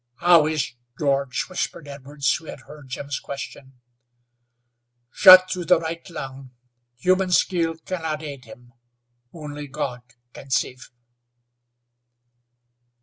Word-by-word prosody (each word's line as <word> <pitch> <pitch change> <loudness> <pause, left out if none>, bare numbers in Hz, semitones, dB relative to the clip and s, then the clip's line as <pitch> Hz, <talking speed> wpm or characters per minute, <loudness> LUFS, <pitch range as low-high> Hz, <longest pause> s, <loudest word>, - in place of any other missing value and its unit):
"How 170 0 +5
is 155 -5 -2 0.2
George?" 140 -2 0
whispered 170 -4 -4
Edwards, 140 0 -2
who 165 - -8
had - - -9
heard 150 -3 -14
Jim's 140 +1 -5
question. 135 -2 -9 1.3
"Shot 185 -1 +8
through 180 -2 -3
the 180 0 +4
right 165 +1 -6
lung. 135 -5 -8 0.5
Human 185 +6 +1
skill 170 -2 +1
can 180 +2 -6
not 155 -1 -3
aid 140 -4 -8
him! 120 0 -15 0.6
Only 150 -2 -8
God 135 -3 -4 0.3
can 135 - -12
save." 130 0 -2
150 Hz, 115 wpm, -23 LUFS, 135-170 Hz, 1.3 s, Shot